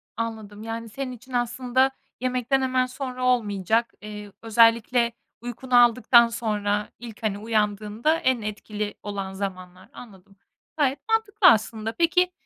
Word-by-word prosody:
Anladım. 220 -2 -5
Yani, 225 0 -5
senin 265 +3 -5
için 250 +1 -12
aslında 245 +2 +1 0.3
yemekten 255 +1 0
hemen 255 -1 +1
sonra 255 0 -5
olmayacak. 225 -2 +1
Eee, 210 -1 -8
özellikle 230 +1 +3 0.3
uykunu 245 +1 +2
aldıktan 235 0 +5
sonra 210 -3 -2
ilk, 230 -2 -10
hani, 205 -2 0
uyandığında 215 +5 0
en 260 -5 +1
etkili 210 0 -5
olan 195 -2 -5
zamanlar. 185 -2 -7
Anladım, 195 -4 -14 0.4
gayet 280 -2 +1
mantıklı 445 -2 +3
aslında. 220 0 +3
Peki, 360 +2 +2
230 Hz, 125 wpm, -24 LUFS, 210-255 Hz, 0.4 s, aldıktan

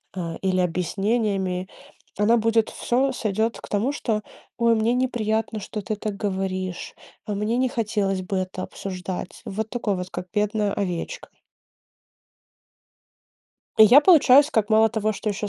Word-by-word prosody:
а, 170 -3 -4
или 185 -1 +2
объяснениями, 190 +1 -1 0.5
она 220 +4 +4
будет 225 0 +2
всё 265 +3 0
сойдет 220 -1 -1
к - - -11
тому, 210 +6 0
что: 225 -7 -2 0.4
"Ой, 235 -1 +3
мне 225 +2 +1
неприятно, 225 -3 -1
что 210 +1 -6
ты 215 - -3
так 210 0 -4
говоришь, 190 -2 -3 0.3
а 210 - -3
мне 210 +4 -1
не 255 0 +1
хотелось 205 -5 -1
бы 190 +1 -3
это 185 0 -3
обсуждать". 185 -1 -6
Вот 220 +2 -4
такое 230 -5 -1
вот, 180 0 -5
как 180 0 -6
бедная 210 -1 0
овечка. 180 -4 -4 2.5
И - - +8
я 245 +7 +8
получаюсь 295 -4 +6
как 215 -2 0
мало 220 +1 +5
того, 215 -1 -1
что 215 - -4
ещё 205 0 -2
210 Hz, 145 wpm, -24 LUFS, 190-230 Hz, 2.5 s, И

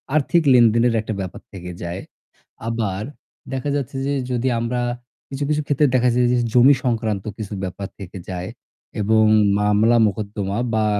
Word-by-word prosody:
আর্থিক 160 +3 +2
লেনদেনের 120 0 +4
একটা 110 0 -4
ব্যাপার 95 -1 -7
থেকে 90 -2 -8
যায়। 85 +2 -4 0.7
আবার 110 -4 -2 0.5
দেখা 135 +2 -2
যাচ্ছে 140 -2 -3
যে 140 - 0 0.2
যদি 125 +1 0
আমরা 120 +2 -2 0.5
কিছু, 135 +1 -4
কিছু 150 0 +1
ক্ষেত্রে 145 +1 +2
দেখা 125 0 +3
যায়, 125 0 +3
যে - - +3 0.2
জমি 130 +3 +7
সংক্রান্ত 110 -5 -1
কিছু 105 -1 -6
ব্যাপার 95 +1 -5
থেকে 95 0 -8
যায় 90 -1 -4 0.5
এবং 110 +2 +3 0.4
মামলা-মোকদ্দমা 105 -1 +1 0.2
বা 110 -1 +2
110 Hz, 145 wpm, -21 LUFS, 100-125 Hz, 0.7 s, জমি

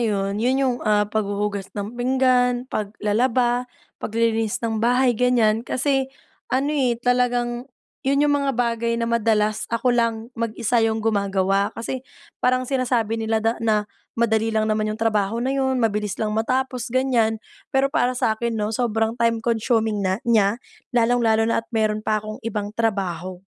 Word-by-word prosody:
'yon, 200 -2 -1
yun 255 +3 +2
yung, 255 -3 +1
ah, 210 -1 +3
paghuhugas 205 -1 -2
ng 205 +2 -4
pinggan, 250 -1 +2
paglalaba, 240 +3 0 0.3
paglilinis 225 -1 0
ng 225 -1 -1
bahay, 245 +2 +3
ganyan. 230 -2 +2
Kasi 265 +2 0 0.4
ano, 270 +3 0
eh, 255 -5 +1
talagang 245 +1 0 0.3
yun 280 +2 +2
yung 290 - +3
mga 275 -1 0
bagay 235 -1 0
na 230 - -1
madalas 215 -2 +1
ako 245 +2 +1
lang 230 -1 +2 0.2
mag-isa 230 0 0
yung 225 -1 +1
gumagawa. 200 -2 +1
Kasi 245 +3 -4 0.4
parang 255 0 +2
sinasabi 245 -4 0
nila 220 0 0
da 225 +1 +1
na, 215 -2 +1 0.3
"Madali 225 -1 +2
lang 220 -1 +1
naman 215 0 0
yung 215 - -3
trabaho 220 0 0
na 265 - 0
'yon, 265 -1 +1
mabilis 210 -4 0
lang 215 -1 -2
matapos." 250 +2 -1
ganyan. 240 -3 +1 0.3
Pero 275 0 +1
para 255 -3 +1
sakin 225 0 0
'no, 210 0 -1
sobrang 225 -1 0
time 230 -1 +1
consuming 225 -2 +1
na 190 -1 0
niya, 220 -2 +3 0.4
lalong-lalo 230 -2 +3
na 230 0 +1
at 230 - -24
meron 215 -2 0
pa 215 0 0
akong 215 0 -7
ibang 210 -2 -4
trabaho. 190 -5 -2
230 Hz, 155 wpm, -22 LUFS, 215-245 Hz, 0.4 s, ah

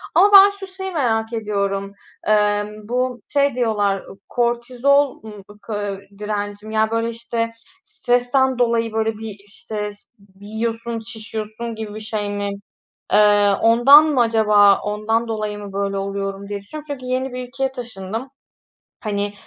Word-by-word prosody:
Ama 410 +1 +6
ben 395 0 +10
şu 390 - -7
şeyi 380 0 -6
merak 230 -8 0
ediyorum: 200 -3 -2 0.4
Emm, 210 0 +1
bu 250 -1 -1
şey 280 -2 +2
diyorlar, 205 -5 0 0.3
kortizol 245 +3 +1
ım 210 -3 -10
ıkı 205 -1 -5 0.2
direncim. 210 0 -4
Ya, 220 0 +1
böyle, 230 0 0
işte 230 0 -3 0.3
stresten 245 0 +1
dolayı 230 -1 +1
böyle 225 0 0
bir 220 -2 -7
işte 210 +1 -5
ş 205 - -22 0.4
yiyorsun, 225 +2 -3
şişiyorsun 220 0 -6
gibi 215 -1 -6
bir - - -5
şey 215 -1 -3
mi, 205 0 -2 0.6
eee, 205 -1 +5
ondan 240 +7 +7
mı 290 -5 +2
acaba, 210 -3 +5
ondan 215 +3 -1
dolayı 215 -2 -3
mı 200 -1 -9
böyle 200 0 -1
oluyorum 195 0 -4
diye 205 0 -5
düşünüyorum. 300 +9 -9
Çünkü 260 -3 -6
yeni 255 +1 -2
bir 250 0 -5
ülkeye 265 +1 -2
taşındım, 230 -1 -6 0.7
hani, 205 -1 -2
220 Hz, 140 wpm, -21 LUFS, 205-245 Hz, 0.7 s, ben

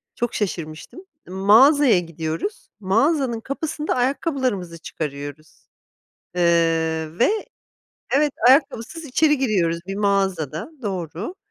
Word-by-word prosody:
Çok 240 0 -2
şaşırmıştım. 175 - -5 0.2
M 180 - -9
mağazaya 235 - +6
gidiyoruz, 165 - -5
mağazanın 235 - +1
kapısında 300 +4 -3
ayakkabılarımızı 255 - -1
çıkarıyoruz. 145 -1 -7 0.7
Iıı, 165 -2 +1
ve 245 - +4 0.8
Evet, 295 +1 +3 0.2
ayakkabısız 275 +3 +2
içeri 300 +2 +2
giriyoruz 185 -10 +1
bir 195 - -4
mağazada, 195 - -1
doğru. 190 - -4
200 Hz, 95 wpm, -22 LUFS, 165-270 Hz, 0.8 s, mağazaya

